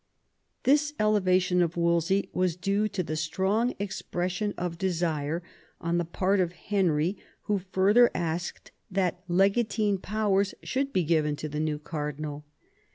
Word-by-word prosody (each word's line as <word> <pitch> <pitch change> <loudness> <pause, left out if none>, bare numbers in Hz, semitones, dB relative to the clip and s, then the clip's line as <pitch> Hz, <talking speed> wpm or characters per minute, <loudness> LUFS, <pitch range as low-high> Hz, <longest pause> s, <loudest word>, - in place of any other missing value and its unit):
This 295 +2 +3
elevation 185 -4 +3
of 175 0 0
Wolsey 170 +3 +2
was 180 -2 +1
due 200 +4 0
to 195 -3 -2
the 155 -1 -3
strong 190 +10 0
expression 190 0 -3
of 175 -1 -3
desire 170 -3 -1 0.4
on 170 0 0
the 175 - -1
part 190 +4 +1
of 175 -2 +1
Henry, 180 -3 0 0.3
who 205 -1 0
further 195 +6 +4
asked 170 +1 -3 0.2
that 185 -2 0
legatine 200 +2 +2
powers 200 -1 0
should 275 +1 -1
be 185 - +1
given 155 -2 +1
to 155 - -5
the 150 0 -4
new 155 -1 0
cardinal. 150 -1 -5
180 Hz, 140 wpm, -28 LUFS, 165-200 Hz, 0.4 s, further